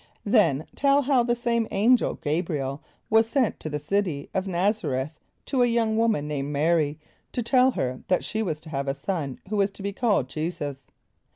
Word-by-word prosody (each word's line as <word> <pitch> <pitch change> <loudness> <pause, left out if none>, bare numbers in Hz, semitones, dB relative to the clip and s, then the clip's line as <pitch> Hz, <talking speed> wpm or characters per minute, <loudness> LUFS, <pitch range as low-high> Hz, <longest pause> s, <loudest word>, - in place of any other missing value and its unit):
Then 170 - +3
tell 280 +1 +3
how 265 -2 +3
the 240 0 +1
same 235 -1 0
Angel 235 +5 +3
G[=a]´br[)i] 155 +1 -1
el 135 +1 -4 0.3
was 225 +1 +4
sent 255 -4 +1
to 155 - -5
the 150 - -2
City 155 -2 -2
of 190 - 0
N[)a]z´a 190 -1 0
r[)e]th 135 +4 -4 0.3
to 265 -3 0
a 245 - +5
young 230 -2 +1
woman 220 -10 +1
named 140 -2 -2
M[=a]´r[)y] 155 -1 +2 0.4
to 245 - -1
tell 255 +2 +4
her 130 - -2
that 185 - +2
she 220 - -2
was 160 -8 -2
to 160 - -12
have 140 -2 -3
a 135 - 0
son 150 -7 -3
who 210 - -1
was 200 0 +3
to 195 0 -12
be 200 0 -2
called 205 - +1
J[=e]´[s+]us. 150 -1 -4
195 Hz, 200 wpm, -25 LUFS, 150-230 Hz, 0.4 s, a